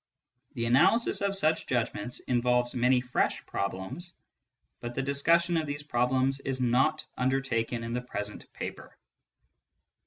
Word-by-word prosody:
The 115 -2 -1
analysis 140 - +4
of 200 0 +1
such 160 -4 +1
judgments 120 -1 -2
involves 125 0 +1
many 125 +1 +3
fresh 125 0 -1
problems, 125 - -4 0.6
but 120 0 -6
the 135 - -1
discussion 165 +5 +2
of 160 -1 -1
these 145 0 -4
problems 130 0 +1
is 135 -1 -3
not 130 +5 +2
undertaken 125 -3 0
in 115 0 -4
the 125 - -1
present 105 -4 -6
paper. - - -7
130 Hz, 130 wpm, -29 LUFS, 120-145 Hz, 0.6 s, analysis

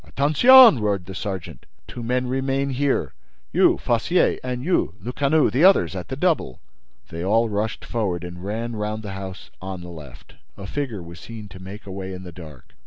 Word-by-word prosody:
"Attention!" 190 - +7
roared 100 -4 -1
the 95 - -8
sergeant. 95 -1 -6 0.2
"Two 120 - -8
men 125 +2 -1
remain 135 +2 -1
here: 135 +1 0 0.4
you, - - +4
Fossier—and 125 -1 0
you, 180 +4 0
Lecanu—The 135 - +1
others 180 - +5
at 90 - -5
the 130 - -4
double!" 150 - 0 0.5
They 85 +1 -6
all 115 +4 +2
rushed 105 +1 -3
forward 100 -7 -2
and 90 0 -8
ran 115 +4 -4
round 105 +1 -3
the 100 - -6
house 95 -1 -8
on 95 -1 -6
the 90 - -9
left. 75 -6 -12 0.2
A 100 - -8
figure 115 -4 -4
was 85 0 -11
seen 110 -1 -9
to 95 -1 -12
make 100 +3 -10
away 95 -1 -6
in 90 - -9
the 90 - -9
dark. 80 -7 -13
105 Hz, 175 wpm, -23 LUFS, 95-130 Hz, 0.5 s, Attention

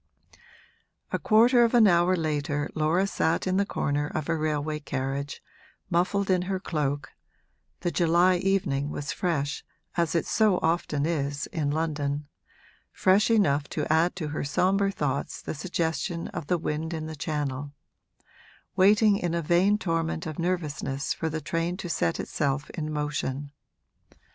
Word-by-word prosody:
A - - 0
quarter 240 +3 +5
of 235 +1 +2
an 230 -2 +7
hour 175 -1 +4
later 150 -2 -1
Laura 160 +5 +2
sat 165 -4 0
in 185 0 +1
the 200 0 +1
corner 145 -4 -1
of 155 0 -4
a 165 - +2
railway 155 -1 -1
carriage, 140 0 -4 0.5
muffled 190 +3 +1
in 180 -1 +3
her 190 -1 -1
cloak 145 -6 -2 0.7
(the 175 0 0
July 175 +2 +4
evening 175 -7 0
was 145 -1 -4
fresh, 150 -5 -1 0.3
as 170 -1 0
it 165 - +1
so 215 -4 +3
often 160 -3 +1
is 145 -3 -1
in 150 -3 0
London 150 -2 -2 0.6
fresh 195 +4 +3
enough 150 -11 +2
to 150 - -2
add 165 +3 +2
to 160 -5 -4
her 150 - -3
sombre 190 +8 +2
thoughts 140 -6 -2
the - - -5
suggestion 165 +1 -2
of 145 - -6
the 180 - +2
wind 160 +1 -3
in 155 -1 -4
the 160 0 -6
Channel), 145 -2 -3 1.0
waiting 205 +2 +5
in 175 -3 -1
a 170 - 0
vain 180 +6 +3
torment 165 -2 -1
of 155 -1 -5
nervousness 155 -5 -2
for 160 - -3
the 160 0 -3
train 165 +3 -2
to 190 - -5
set 85 - 0
itself 140 -1 -2
in 155 -2 -4
motion. 145 -2 -3
160 Hz, 155 wpm, -27 LUFS, 145-180 Hz, 1.0 s, an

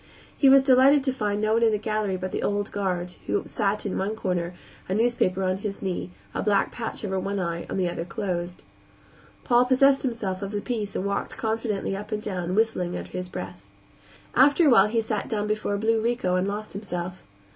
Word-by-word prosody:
He 275 - +5
was 270 0 +7
delighted 270 +2 +6
to 265 -2 0
find 210 -4 -1
no 215 +1 +1
one 230 - +3
in 230 -1 +4
the 210 - +1
gallery 215 -2 -1
but 185 0 -4
the - - -2
old 205 0 -1
guard, 180 -3 -2
who - - 0
sat 210 -1 -1
in 200 - -2
one 205 +3 -1
corner, 180 -4 -2 0.3
a 190 - 0
newspaper 215 -5 +1
on 185 0 +1
his 200 0 -5
knee, 185 -1 -3 0.2
a - - -2
black 205 -1 +2
patch 225 -2 -5
over 190 -1 -1
one 200 +1 -2
eye 170 -2 -3
and - - -2
the 180 - +2
other 170 -1 -3
closed. 175 -1 -4 0.8
Paul 245 0 +4
possessed 270 +2 +4
himself 210 -7 -2
of 200 +1 -5
the 205 - 0
peace 210 -3 -3
and 185 - -2
walked 200 0 -2
confidently 220 -3 -1
up 210 +3 -7
and 215 - -1
down, 185 -4 -3
whistling 200 -5 +1
under - - -8
his 180 0 -4
breath. 95 - -7 0.7
After 285 +6 +5
a 285 - +6
while 230 - +7
he 225 +1 +1
sat 215 -2 -3
down 210 -2 -1
before 215 -1 -1
a - - -1
blue 220 +2 +1
Rico 230 -6 0
and 185 +1 +1
lost 210 +1 -4
himself. 185 -3 -5
205 Hz, 215 wpm, -25 LUFS, 185-225 Hz, 0.8 s, was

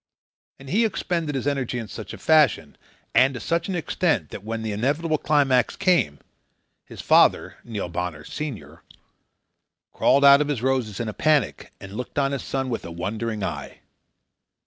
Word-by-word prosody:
And 135 - -14
he 220 +6 +3
expended 170 -8 -2
his 135 - -3
energy 135 -4 -1
in 115 -2 -5
such 110 0 -8
a - - -8
fashion 150 - +3 0.4
and 130 +1 +4
to - - -5
such 170 +3 -1
extent 165 - -1
that 100 - -8
when 110 +1 -4
the 110 - -3
inevitable 145 +9 0
climax 135 -5 +2
came, 175 - +2 0.7
his - - -10
father, - - +3
Neil 105 -6 -4
Bonner, 85 -3 -4
senior, 145 - -7 1.1
crawled 140 +1 +3
out 140 +1 +8
of 150 - 0
his 135 -6 -2
roses 130 -6 0
in 115 - -2
a 110 - -4
panic 150 -3 0
and 95 0 -10
looked 125 +6 -7
on 140 -1 +2
his 140 - -3
son 135 -1 -3
with 115 - -3
a - - -7
wondering 105 +5 -4
eye. - - -5
130 Hz, 170 wpm, -24 LUFS, 110-150 Hz, 1.1 s, out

